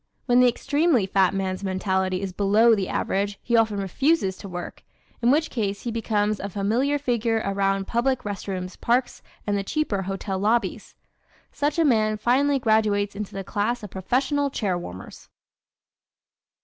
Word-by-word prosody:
When 245 -1 +4
the 250 - +6
extremely 285 - +1
fat 190 -1 +3
man's 190 0 -3
mentality 190 0 -1
is 190 -2 -4
below 210 +4 +4
the 200 -3 -1
average 200 +1 -1
he 235 - +1
often 220 -2 +3
refuses 200 - +1
to 200 - -9
work 175 -1 -7 0.4
in 240 - +3
which 310 +4 +2
case 205 -4 -2
he 235 - -3
becomes 215 -2 0
a 200 - -4
familiar 225 +9 0
figure 235 -5 0
around 195 0 0
public 245 +3 0
rest 205 -1 -5
rooms, 185 -1 -4
parks 245 +2 0 0.2
and 205 - 0
the 200 - -1
cheaper 210 -4 -1
hotel 195 0 -3
lobbies. 225 +4 0 0.6
Such 295 +2 -1
a 330 - +3
man 215 -5 +2
finally 275 +6 +2
graduates 215 -4 +1
into 210 -1 -6
the 195 - -4
class 220 +5 -2
of 205 - -8
professional 270 - 0
chair 205 -8 -1
warmers. 95 - -9
210 Hz, 160 wpm, -24 LUFS, 195-245 Hz, 0.6 s, the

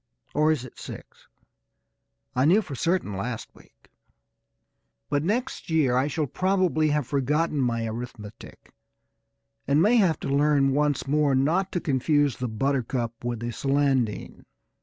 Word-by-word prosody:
(Or 155 +1 +3
is 140 -5 -1
it 125 - -13
six? - - -11 1.1
I 130 +2 +3
knew 195 +8 +4
for 150 - -8
certain 165 - -1
last 115 +4 -5
week.) - - -23 1.2
But 145 0 +1
next 230 +6 -2
year 150 -6 +2
I 130 +3 +2
shall 150 +1 -1
probably 185 -1 +1
have 150 -2 0
forgotten 145 +4 0
my 115 -2 0
arithmetic, 110 -2 -8 0.9
and 140 +2 +3
may 215 +8 +4
have 185 -7 +3
to - - -4
learn 140 -1 +3
once 145 -1 +1
more 145 0 +2
not 165 +9 +1
to 175 - 0
confuse 145 -2 +1
the 125 - -3
buttercup 120 -1 -2
with 120 -2 -3
the 120 0 -3
celandine. 135 -2 -1
140 Hz, 140 wpm, -25 LUFS, 125-155 Hz, 1.2 s, knew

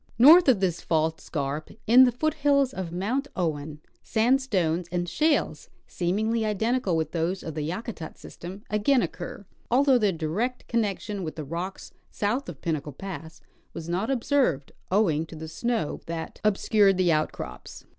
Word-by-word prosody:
North 310 +9 +8
of 235 -7 +4
this 180 -3 0
fault 160 0 0
scarp, 145 0 -3 0.2
in 250 +4 +8
the 250 - +2
foothills 280 0 +1
of 185 -6 -5
Mount 225 +11 -1
Owen, 150 -3 -3 0.2
sandstones 220 - +1
and 175 0 -1
shales, 305 - 0 0.2
seemingly 215 +6 0
identical 220 -1 0
Avith 160 -1 -1
those 175 +3 -1
of 160 - -5
the 155 - -3
Yakutat 175 +2 -5
system, 190 +4 -10
again 230 +5 +3
occur, 180 +2 -6 0.2
although 260 +1 +4
their 210 -3 +3
direct 185 +10 -2
connection 210 -3 -1
with 155 - -5
the 155 - -5
rocks 175 +6 -5 0.2
south 225 +5 -1
of 150 -6 -9
Pinnacle 150 -3 -3
pass 170 -1 -8 0.3
was 165 - -7
not 185 +7 -1
observed, 255 - +1 0.2
owing 180 -6 +2
to 165 - -10
the 160 0 -7
snow 230 0 -2
that 165 -1 -6
obscured 205 -1 +3
the 180 -2 +3
outcrops. 155 -1 -3
190 Hz, 155 wpm, -26 LUFS, 160-235 Hz, 0.3 s, North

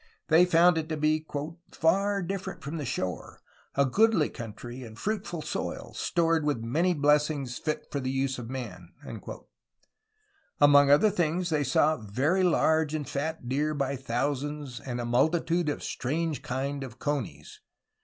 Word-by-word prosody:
They 165 +3 +6
found 175 -1 +5
it 160 0 -5
to 155 - -2
be 155 +1 +1 0.4
"farre 195 +4 +1
different 190 +1 -5
from 150 +4 -4
the 150 - -4
shoare, 95 -7 -4 0.4
a 140 - +4
goodly 205 - +3
country, 120 +3 -8
and 110 -3 -10
fruitfull 190 - -3
soyle, - - -4
stored 165 -2 +1
with 145 -6 -1
many 165 +10 +1
blessings 145 -3 +1
fit 155 -1 -3
for 140 - -1
the 130 -1 -2
vse 135 -1 -3
of 115 -1 -7
man." 105 -10 -7 1.7
Among 145 -1 +7
other 150 +9 +6
things 175 -1 0
they 150 -2 +2
saw 150 +4 +3
'Very 135 - 0
large 160 -3 +2
and 150 -4 -3
fat 145 -1 -3
Deere... 150 +4 0
by 140 -1 -1
thousands" 135 +1 -3
and 125 -1 -5
'^a, 120 - -2
multitude 165 +6 +2
of 145 - -3
a - - -9
strange 155 +3 -2
kinde 135 +2 -3
of 125 -3 -9
Conies. 120 - -4
145 Hz, 155 wpm, -28 LUFS, 130-165 Hz, 1.7 s, Among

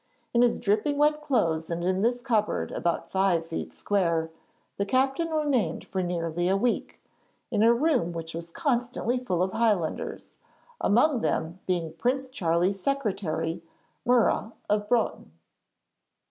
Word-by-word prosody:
In 235 - +4
his 245 -1 +4
dripping 215 +8 +1
wet 300 +1 +3
clothes 170 - 0
and 170 0 -2
in 185 +1 +1
this 245 +2 +1
cupboard 220 -5 0
about 170 -1 -2
five 190 -4 +2
feet 165 0 -5
square, 170 -5 0 0.5
the 200 - +1
captain 270 +7 +1
remained 280 - 0
for 190 - -2
nearly 175 0 -1
a 195 - +3
week, 240 +4 -1 0.5
in 205 - +1
a 230 +1 +6
room 250 - +2
which 165 -1 -6
was 170 +1 -6
constantly 245 - -1
full 185 -8 0
of 190 - -1
Highlanders, 210 -8 -1 0.5
among 245 +4 +3
them 170 -2 -1
being 170 -4 -1
Prince 255 +9 -1
Charlie's 180 -2 0
secretary, 195 - -1 0.4
Murray 240 -2 +2 0.2
of 210 0 0
Broughton. 230 - 0
205 Hz, 140 wpm, -27 LUFS, 170-245 Hz, 0.5 s, a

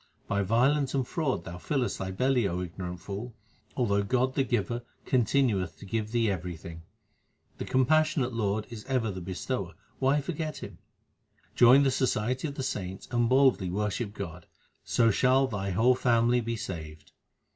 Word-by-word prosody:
By 100 - 0
violence 130 +7 +2
and 130 -3 0
fraud 140 - -1
thou 85 +1 -8
fillest 130 +3 -1
thy 95 - -3
belly, 125 +3 +1
O 90 0 -2
ignorant 90 0 -6
fool, 105 +5 -6 0.4
Although 100 -6 +2
God 130 +5 +1
the 135 - +2
Giver 120 -1 -1 0.2
continueth 115 - +1
to - - -11
give 110 +2 -2
thee 115 -1 +2
everything. 85 -2 -6 0.8
The - - -3
compassionate 145 0 +2
Lord 105 -1 -1
is 110 -3 -7
ever 125 -5 0
the 95 -1 -6
Bestower; 90 +1 -4 0.2
why 135 +2 +3
for 145 - -4
get 155 -1 -4
Him? - - -9 0.7
Join 125 +3 +7
the 135 - +3
society 130 +2 0
of 140 - -6
the 135 - -3
saints 95 -7 -4
and 120 -1 +2
boldly 130 -8 +4
worship 105 +3 -2
God, - - -7 0.4
so 115 -2 +3
shall 130 +5 +3
thy 100 -5 -3
whole 115 +7 +4
family 120 -1 +2
be 115 0 -3
saved. 80 -8 -7
115 Hz, 165 wpm, -28 LUFS, 100-130 Hz, 0.8 s, Join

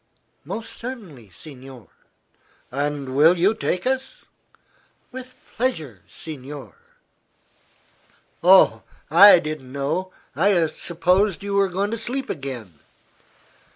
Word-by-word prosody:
"Most 230 0 -6
certainly, 195 - -9
signore." 130 - -13 0.8
"And 145 +1 -2
you - - -6
will 170 +8 +4
take 185 -4 -2
us?" 265 0 -3 0.9
"With 255 0 -10 0.2
pleasure, 155 - -2
signore." 145 -2 -9 1.7
"Oh; 190 +2 +6 0.3
I 190 +4 +9
didn't 155 -5 -5
know. 155 +7 -2 0.2
I 175 +1 +3
supposed 180 +5 0
you 200 0 -4
were 200 -1 +2
going 195 +3 -2
to 230 - -3
sleep 265 +4 -3
again." 125 - -7
170 Hz, 100 wpm, -22 LUFS, 140-205 Hz, 1.7 s, I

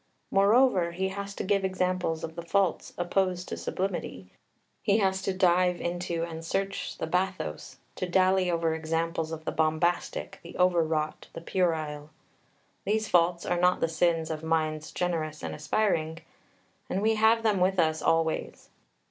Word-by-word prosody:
Moreover, 200 -3 +4
he 190 +2 -1
has 200 +1 -6
to - - -3
give 195 0 +1
examples 185 -3 -1
of 160 - -5
the 170 - -5
faults 180 +1 0
opposed 180 0 0
to - - -3
sublimity, 175 - -4 0.5
he 200 - +3
has 190 -2 +1
to 195 - -1
dive 180 -1 +3
into 175 -1 -2
and 165 -1 -6
search 195 +4 -3
the - - -2
bathos, 180 - -2 0.2
to 185 - -3
dally 185 0 +3
over 165 -2 +1
examples 160 0 -2
of 160 -1 -6
the - - -1
bombastic, 160 +2 0
the 170 - -10
over 180 -1 +4
wrought, 155 -1 -2
the - - -7
puerile. 155 -5 -1 0.7
These 215 0 0
faults 170 0 +3
are 175 - 0
not 180 +1 +3
the - - +2
sins 165 -1 +1
of 155 -1 -4
"minds 155 -1 -1
generous 160 -4 -2
and - - -4
aspiring," 160 0 0 0.7
and 195 - -1
we 220 +1 +4
have 220 +1 +3
them 210 -4 +2
with 190 +1 +2
us 160 -2 +2
always. 165 -1 0
175 Hz, 160 wpm, -28 LUFS, 160-190 Hz, 0.7 s, Moreover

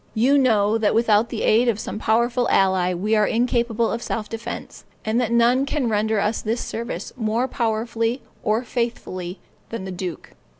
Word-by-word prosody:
You 250 +6 +4
know, 220 -4 +3
that 215 -1 +2
without 225 0 +3
the 230 - -3
aid 230 +3 +4
of 220 -2 0
some 215 - -5
powerful 235 +3 +1
ally 190 -2 +3
we 200 +5 0
are 210 -1 +3
incapable 235 -1 +1
of 235 - -3
self 215 -3 -3
defense, 230 +1 -7 0.2
and 220 +3 +1
that 235 - -1
none 235 +3 +4
can 275 -5 0
render 215 0 +1
us 210 +3 0
this 225 +2 -1
service 235 +2 -5
more 230 +1 0
powerfully 230 0 -1 0.2
or 220 +3 +1
faithfully 220 -7 -3 0.3
than 230 -4 -5
the 190 - -5
duke. 180 -2 -6
225 Hz, 175 wpm, -22 LUFS, 210-235 Hz, 0.3 s, You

